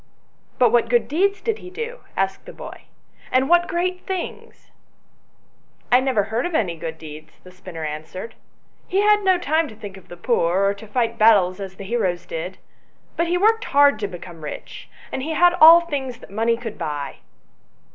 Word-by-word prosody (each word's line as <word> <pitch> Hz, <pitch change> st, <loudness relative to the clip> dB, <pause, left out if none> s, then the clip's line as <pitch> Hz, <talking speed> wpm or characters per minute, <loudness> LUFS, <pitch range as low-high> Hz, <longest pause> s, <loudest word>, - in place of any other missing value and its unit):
" -, -, -39 dB
But 245 Hz, -3 st, +4 dB
what 235 Hz, -1 st, +3 dB
good 240 Hz, -1 st, +2 dB
deeds 395 Hz, +7 st, +1 dB
did 450 Hz, -2 st, -2 dB
he 360 Hz, -, -10 dB
do 465 Hz, +6 st, -6 dB
?" -, -, -31 dB
asked 195 Hz, 0 st, -1 dB
the -, -, -9 dB
boy, -, -, -10 dB, 0.2 s
" -, -, -26 dB
and 260 Hz, +1 st, +3 dB
what 345 Hz, +2 st, +4 dB
great 360 Hz, +2 st, -1 dB
things 375 Hz, -3 st, -6 dB, 0.5 s
?" -, -, -41 dB
" -, -, -38 dB
I 250 Hz, -, +7 dB
never 260 Hz, -6 st, +1 dB
heard 220 Hz, +4 st, -2 dB
of 350 Hz, -, -5 dB
any 180 Hz, -, 0 dB
good 160 Hz, 0 st, -6 dB
deeds," 155 Hz, 0 st, -11 dB
the 185 Hz, -, -14 dB
spinner 180 Hz, -3 st, -9 dB
answered; 160 Hz, +8 st, -6 dB, 0.3 s
" -, -, -41 dB
he 390 Hz, +2 st, +1 dB
had 420 Hz, 0 st, +4 dB
no 375 Hz, -1 st, +4 dB
time 320 Hz, -1 st, +1 dB
to 220 Hz, -, -12 dB
think 205 Hz, -3 st, -9 dB
of 185 Hz, -1 st, -16 dB
the 175 Hz, -, -11 dB
poor, 185 Hz, -2 st, +1 dB
or 200 Hz, -, +2 dB
to 205 Hz, +2 st, -12 dB
fight 230 Hz, +1 st, -1 dB
battles 200 Hz, -4 st, +5 dB
as 190 Hz, -1 st, -7 dB
the 200 Hz, -, -9 dB
heroes 190 Hz, -5 st, -1 dB
did; -, -, -6 dB, 0.6 s
but 335 Hz, -, 0 dB
he 350 Hz, +1 st, +1 dB
worked 440 Hz, +4 st, +3 dB
hard 285 Hz, -4 st, +4 dB
to* 205 Hz, -, -2 dB
become 175 Hz, -3 st, -10 dB
rich, 150 Hz, -, -8 dB, 0.2 s
and -, -, -3 dB
he 315 Hz, +4 st, -3 dB
had 350 Hz, +1 st, +5 dB
all 330 Hz, +2 st, +10 dB
things 275 Hz, -7 st, -4 dB
that 220 Hz, -, -15 dB
money 225 Hz, +3 st, +1 dB
could 230 Hz, -3 st, -7 dB
buy." 145 Hz, -2 st, -4 dB
235 Hz, 210 wpm, -22 LUFS, -, 0.6 s, all